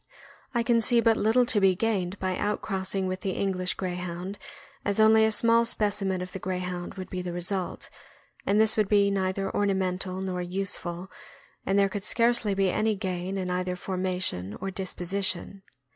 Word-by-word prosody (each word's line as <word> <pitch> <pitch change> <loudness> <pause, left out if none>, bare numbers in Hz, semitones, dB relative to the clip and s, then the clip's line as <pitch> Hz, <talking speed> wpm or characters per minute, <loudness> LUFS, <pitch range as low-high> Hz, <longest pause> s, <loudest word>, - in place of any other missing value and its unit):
I 235 - +2
can 230 -1 +3
see 240 +1 +4
but 230 -1 +4
little 225 +4 +3
to 225 -3 +3
be 190 -1 +5
gained 195 -3 -1
by 185 -1 -1
outcrossing 195 -2 -2
with 185 0 -3
the 190 - -2
English 185 -2 -1
Greyhound, 180 +1 -4 0.4
as 200 +1 0
only 220 0 +6
a - - +3
small 230 +1 +5
specimen 205 -4 +1
of 180 - -8
the 190 - -6
Grey 185 0 -2
hound 180 -1 -5
would 185 -1 -7
be 185 - -3
the 180 -1 -5
result, 180 +1 -3 0.5
and 205 +2 +2
this 220 0 +4
would 215 -3 +1
be 200 -1 +4
neither 195 0 -1
orna 200 0 +1
mental 185 0 -1
nor 185 -1 -3
useful, 180 -1 -4 0.6
and 195 - +2
there 200 0 +5
could 195 0 -5
scarcely 230 -2 +2
be 195 -1 +2
any 215 0 +1
gain 190 -1 -3
in 185 -1 -2
either 180 0 -1
formation 180 - -2
or 195 +1 -4
disposition. 190 0 -3
190 Hz, 180 wpm, -27 LUFS, 185-205 Hz, 0.6 s, only